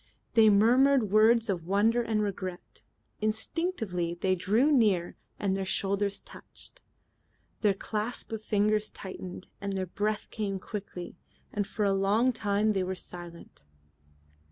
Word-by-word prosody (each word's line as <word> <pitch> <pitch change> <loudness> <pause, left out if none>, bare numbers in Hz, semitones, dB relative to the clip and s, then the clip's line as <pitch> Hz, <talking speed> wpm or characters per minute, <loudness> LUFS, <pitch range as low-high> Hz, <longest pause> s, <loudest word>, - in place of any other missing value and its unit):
They 220 -1 +7
murmured 240 +2 +4
words 220 +2 +5
of 175 -5 -2
wonder 215 +5 +3
and 220 -2 0
regret. 185 -3 -5 0.4
Instinctively 215 - -2
they 185 +2 +1
drew 215 - +2
near 205 - +3 0.2
and 195 -2 0
their 195 - -1
shoulders 200 +1 -1
touched. - - -10 0.8
Their 205 -3 +3
clasp 215 +5 -3
of 220 -1 -4
fingers 210 0 +2
tightened 185 -1 -8
and 200 0 -3
their 190 -1 -1
breath 210 +4 -2
came 200 -3 -2
quickly, 185 -4 -7 0.4
and 205 -1 -1
for 210 - -1
a 200 - +3
long 205 +6 +2
time 210 0 +1
they 195 - 0
were 185 +1 -2
silent. 175 - -9
205 Hz, 135 wpm, -29 LUFS, 190-220 Hz, 0.8 s, They